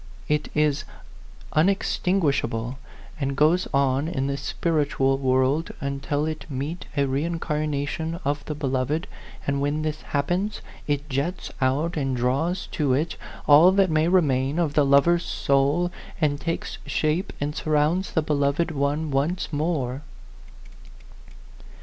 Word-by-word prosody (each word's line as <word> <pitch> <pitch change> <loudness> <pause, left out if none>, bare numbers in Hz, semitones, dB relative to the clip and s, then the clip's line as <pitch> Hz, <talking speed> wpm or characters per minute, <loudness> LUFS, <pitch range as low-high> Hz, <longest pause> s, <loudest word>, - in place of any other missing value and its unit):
It 150 0 0
is 150 -1 +2 0.7
unex 190 +6 +2
tinguishable, 140 -9 0 0.4
and 135 -1 -1
goes 160 +5 +3
on 140 +1 +2
in 135 -6 -1
the 140 0 -1
spiritual 140 -2 0
world 130 +4 +2
until 140 +2 -2
it 155 0 -5
meet 145 +5 -4
a 140 - +3
reincarnation 155 +1 -2
of 145 0 -1
the 150 - -4
beloved; 140 +3 -1 0.4
and 140 0 0
when 145 +2 0
this 155 0 -3
happens, 180 +8 -1 0.3
it 145 0 -1
jets 145 +6 -2
out 145 +6 +1
and 135 -3 -1
draws 140 +10 0
to 145 -4 +1
it 155 +5 0 0.3
all 155 +5 +8
that 195 -3 +3
may 155 +1 +3
remain 145 -5 +2
of 165 -4 +1
that 150 -1 +4
lover's 140 +5 +4
soul, 140 +6 +1 0.3
and 145 -3 +1
takes 165 0 -3
shape 155 +4 0
and 145 +1 -2
surrounds 155 +5 +1
the 160 - +2
beloved 145 +2 +1
one 145 +1 -1
once 155 +6 -1
more." 145 -4 -1
150 Hz, 130 wpm, -25 LUFS, 140-160 Hz, 0.7 s, all